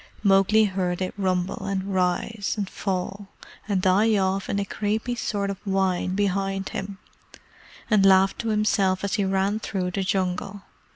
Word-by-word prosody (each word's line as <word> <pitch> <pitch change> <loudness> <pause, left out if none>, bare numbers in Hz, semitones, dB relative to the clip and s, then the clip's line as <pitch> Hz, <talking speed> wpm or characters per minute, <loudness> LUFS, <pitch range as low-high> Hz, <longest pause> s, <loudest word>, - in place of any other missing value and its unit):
Mowgli 200 +2 +5
heard 185 -3 -1
it 185 -1 -3
rumble, 185 -2 -1
and 195 0 -2
rise, 190 +3 0
and 200 -2 -2
fall, 195 +1 -4 0.4
and 195 -3 0
die 205 +4 +4
off 190 0 0
in - - 0
a 200 - -1
creepy 215 +4 -2
sort 205 -4 -2
of 195 - -7
whine 190 -2 0
behind 195 -1 -1
him, 195 0 -5 0.9
and 210 -4 +3
laughed 195 0 +5
to 230 - -3
himself 205 -3 +1
as 200 - -2
he 205 - +1
ran 195 +2 0
through 185 -4 -3
the 195 - -2
Jungle. 190 +1 -2
195 Hz, 160 wpm, -24 LUFS, 190-205 Hz, 0.9 s, Mowgli